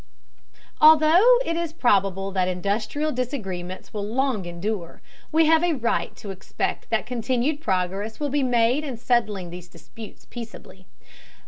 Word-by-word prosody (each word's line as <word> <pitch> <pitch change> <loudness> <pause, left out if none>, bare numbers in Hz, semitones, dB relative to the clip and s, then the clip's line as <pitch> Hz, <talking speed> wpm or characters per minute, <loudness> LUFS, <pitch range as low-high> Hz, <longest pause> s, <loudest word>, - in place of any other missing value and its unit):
Although 315 +10 +7
it 330 - -1
is 335 -2 -3
probable 195 - +1
that 185 -1 0
industrial 210 +11 -1
disagreements 195 -9 -5
will 210 -2 -3
long 230 -2 -1
endure, 175 +1 -4 0.3
we 320 +1 +4
have 320 +1 +4
a 350 -1 +2
right 235 -3 -1
to 200 - -8
expect 190 0 -4
that - - 0
continued 250 +5 -1
progress 195 - -2
will 295 -1 -1
be 290 0 +1
made 245 +2 +2
in 270 -6 -5
settling 215 -7 0
these 175 0 -9
disputes 175 +6 -13
peaceably. 225 -5 -10
230 Hz, 140 wpm, -24 LUFS, 190-290 Hz, 0.3 s, Although